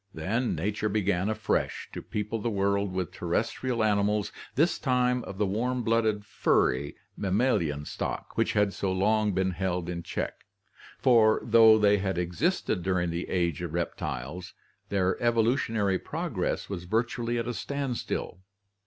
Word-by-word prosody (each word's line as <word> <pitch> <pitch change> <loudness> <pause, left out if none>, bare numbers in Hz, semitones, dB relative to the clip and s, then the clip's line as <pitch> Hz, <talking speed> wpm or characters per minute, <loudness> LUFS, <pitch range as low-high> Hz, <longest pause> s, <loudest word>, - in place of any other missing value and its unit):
Then 110 +10 -1
nature 105 +6 -1
began 100 -2 +1
afresh 110 0 -1
to - - -5
people 105 +2 -3
the 115 - 0
world 100 -1 0
with 90 -1 -3
terrestrial 115 +6 -1
animals, 105 -1 +1 0.2
this 160 +6 +2
time 125 -2 +1
of 100 - -8
the 105 - +2
warm 120 +6 -1
blooded 110 -2 +1
funy 70 -8 +1 0.2
mammalian 95 - 0
stock - - -5
which - - +1
had 105 -2 +2
so 95 - -1
long 105 +3 +2
been 95 0 +1
held 90 -1 -2
in 85 -1 -3
check, - - -4 0.6
for 115 -4 +5
though 115 -1 +7
they 105 -1 +4
had 95 -2 -1
existed 90 - 0
during 90 -1 0
the 85 +1 -4
Age 85 -3 0
of 85 -2 -4
Reptiles 85 0 -4 0.4
their 95 -2 0
evolutionary 115 -4 +2
prog - - -5
ress - - -1
was 90 -3 -5
virtually 115 +4 -1
at 115 0 -2
a 120 - -2
standstill. 135 -9 -3
105 Hz, 150 wpm, -28 LUFS, 90-115 Hz, 0.6 s, though